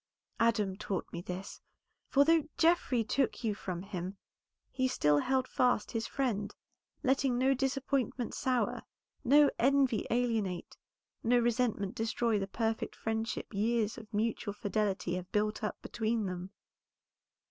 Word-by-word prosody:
Adam 215 -4 +2
taught 195 -2 -3
me - - -4
this, 180 +2 -7 0.5
for 280 +1 +4
though 320 -1 +3
Geoffrey 325 -8 +3
took 250 +3 0
you 220 -2 +1
from 185 -3 -5
him, 190 -1 -5 0.5
he 260 -1 +1
still 150 - +3
held 260 - +1
fast 250 -4 +1
his 225 -2 -2
friend, 225 -7 -2 0.5
letting 265 -1 +2
no 260 +2 +4
disappointment 270 -2 -1
sour, 255 -2 0 0.4
no 285 +2 +6
envy 265 -3 +3
alienate, 225 -7 -1 0.5
no 245 +2 +3
resentment 235 -4 +1
destroy 225 -1 0
the 195 - -2
perfect 225 +2 -2
friendship 225 +1 -3
years 220 +1 +1
of 220 -3 -11
mutual 210 -1 -1
fidelity 205 -3 -1
have 180 0 -5
built 210 +1 0
up 210 - -2
between 225 -1 -1
them." 180 0 -4
225 Hz, 135 wpm, -32 LUFS, 205-255 Hz, 0.5 s, no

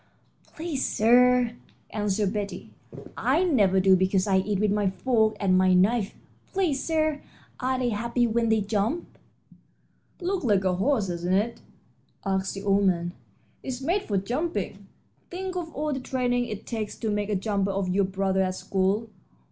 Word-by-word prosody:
"Please, 315 -4 -3
sir," 245 +2 +4 0.4
answered 205 -1 0
Betty, 205 -1 -5 0.4
"I 360 - +2
never 205 - +3
do, 190 0 +5
because 190 0 +2
I 190 -2 +3
eat 200 +1 -1
with 210 -1 +2
my 205 -1 +2
fork 220 +1 +1
and 190 -3 +2
my 185 0 +4
knife. 200 +3 +2 0.4
Please, 335 -8 0
sir, 310 -2 0 0.4
are 260 0 0
they 250 -1 0
happy 235 +3 0
when 230 0 +1
they 220 -1 +3
jump?" 215 - -2 1.0
"Looks 370 0 -2
like 200 -4 +3
a 185 -1 +2
horse, 210 +3 +1
doesn't 175 +1 -2
it?" 215 +5 0 0.6
asked 190 0 -1
the 195 - -6
old 200 0 +3
man. 175 -1 0 0.5
"It's 255 -2 -5
made 350 +9 +1
for 205 - -2
jumping. 255 - -3 0.4
Think 370 +1 -5
of 340 -2 -4
all 300 +1 -1
the 265 - -3
training 245 -1 0
it 215 -4 -7
takes 220 -3 -4
to 220 -2 -2
make 205 0 -1
a 210 - +1
jumper 200 0 0
of 195 -1 -1
your 200 0 +3
brother 190 0 0
at 185 -1 0
school. 195 +4 0
210 Hz, 165 wpm, -26 LUFS, 195-255 Hz, 1.0 s, do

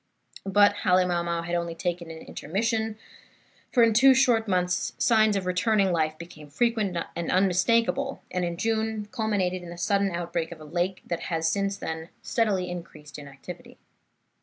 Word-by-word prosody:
But 205 +1 +4
Halemaumau 175 -2 +1
had 170 +1 -5
only 170 -1 -1
taken 175 -1 -3
an 160 - -8
intermission, 220 +4 -2 0.7
for 240 - +5
in 225 -1 +4
two 265 +4 +6
short 245 -4 +3
months 180 -1 0
signs 220 -3 +4
of 195 -2 -1
returning 195 +2 +2
life 155 -2 0
became 155 -3 -11
frequent 215 -1 0 0.2
and 170 0 -3
unmistakable, 230 +9 +2
and, 180 0 -1
in 170 -1 -2
June, 220 0 -1
culminated 200 -6 -1
in 175 - -9
the 170 - -8
sudden 200 +2 +1
outbreak 170 -2 -3
of 170 - -9
a 155 - -11
lake 175 +4 -2
that 170 - -4
has 165 -1 0
since 200 0 -1
then 160 +1 -5
steadily 205 -6 0
increased 155 -5 -8
in 145 - -10
activity." 135 -1 -11
185 Hz, 160 wpm, -26 LUFS, 170-220 Hz, 0.7 s, two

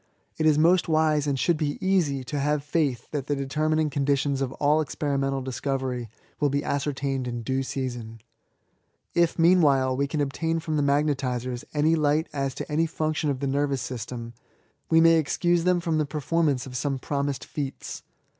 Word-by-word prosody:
It 155 - +3
is 150 -1 +4
most 170 +2 +4
wise, 155 -2 +2
and 140 -1 0
should 165 +6 +2
be 150 -2 -1
easy, 165 -8 +1
to 145 +3 -3
have 150 +1 0
faith 145 -4 -1
that 145 -2 -3
the 145 - 0
determining 155 +3 0
conditipns 140 0 0
of 135 -2 -1
all 150 +3 +2
experimental 135 -2 -1
disco 135 +1 -2
very 125 -3 -4 0.3
will 145 - +2
be 140 +1 -1
ascertained 140 -2 -2
in 120 -1 -4
due 130 +3 0
season. 120 -4 -5 0.9
If, 170 -1 +2
mean 175 +2 +5
while, 135 -4 +3
we 140 +2 0
can 150 +2 -3
obtain 160 +4 -1
from 160 -1 -3
the 150 - +2
magnetisers 135 -4 0
any 150 +2 +3
light 155 0 +1
as 135 -2 -2
to - - -6
any 160 +2 +2
function 155 -1 -1
of 135 -1 -2
the - - 0
nervous 140 -2 0
system;^ 120 -1 -6 0.6
we 160 - +5
may 165 0 +6
excuse 175 +3 +1
them 180 -1 +3
from 165 -2 0
the 155 - +1
performance 150 -2 0
of 135 - -9
UFE 125 - -4
TO - - -1
THB - - -4
INVALID. - - -2
85 - - -11
jsome - - -15
promised 140 -2 -1
feats. 140 -3 -5
145 Hz, 200 wpm, -26 LUFS, 135-155 Hz, 0.9 s, may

